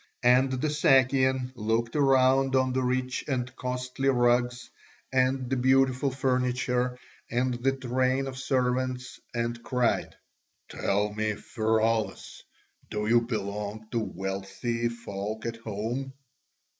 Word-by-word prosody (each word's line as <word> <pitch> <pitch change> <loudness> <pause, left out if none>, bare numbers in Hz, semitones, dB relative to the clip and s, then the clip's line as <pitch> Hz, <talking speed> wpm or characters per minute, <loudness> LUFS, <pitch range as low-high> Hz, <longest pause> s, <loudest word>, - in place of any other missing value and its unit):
And 125 +2 +5
the 145 +4 -1
Sakian 130 -3 +3
looked 115 0 -1
round 135 -1 +4
on 130 -1 +2
the 130 - +1
rich 130 0 -1
and 125 -3 -2
costly 125 +1 -2
rugs, 120 -1 +2 0.5
and 130 0 +2
the 135 - 0
beautiful 130 +1 +3
furniture, 125 -1 0 0.3
and 125 +2 0
the 125 +3 0
train 130 +1 0
of 135 -1 -5
servants, 130 -1 -1 0.2
and 120 0 -2
cried: 125 -1 0 0.5
"Tell 105 +1 0
me, 110 0 -1
Pheraulas, 110 0 -1 0.5
do 105 0 -2
you 120 +1 +5
belong 105 -1 -4
to 115 - 0
wealthy 100 +4 -3
folk 110 -2 -5
at 115 -1 -3
home?" 115 +5 -4
125 Hz, 120 wpm, -28 LUFS, 115-130 Hz, 0.5 s, And